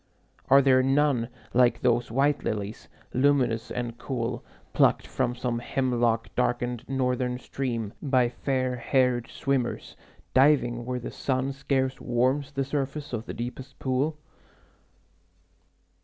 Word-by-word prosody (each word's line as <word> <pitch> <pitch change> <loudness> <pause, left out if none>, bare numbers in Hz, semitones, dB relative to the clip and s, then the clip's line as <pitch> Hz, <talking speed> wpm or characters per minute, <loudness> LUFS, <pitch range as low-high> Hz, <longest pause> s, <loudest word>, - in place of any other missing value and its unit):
Are 140 +1 +7
there 130 -1 +5
none 135 -3 +2 0.2
Like 120 -1 +4
those 120 -1 +2
white 140 +5 +1
lilies, 105 0 -4 0.3
luminous 130 -4 +2
and 120 -1 -4
cool, 120 -4 -3 0.3
Plucked - - +3
from 120 0 -1
some 125 -1 -2
hemlock 120 -3 0
darkened 120 -1 0
northern 125 -2 0
stream 120 -5 -3
By 130 -4 +3
fair 130 0 -1
haired 125 -1 +1
swimmers, 135 -3 -2 0.4
diving 125 -4 +3
where 125 0 -2
the 120 - -6
sun 130 0 -1
Scarce 135 -1 -1
warms 130 +4 +1
the 135 -1 -1
surface 140 0 -3
of 115 -1 -4
the - - -4
deepest 125 +3 -6
pool? 135 +4 0
125 Hz, 125 wpm, -27 LUFS, 120-135 Hz, 0.4 s, Are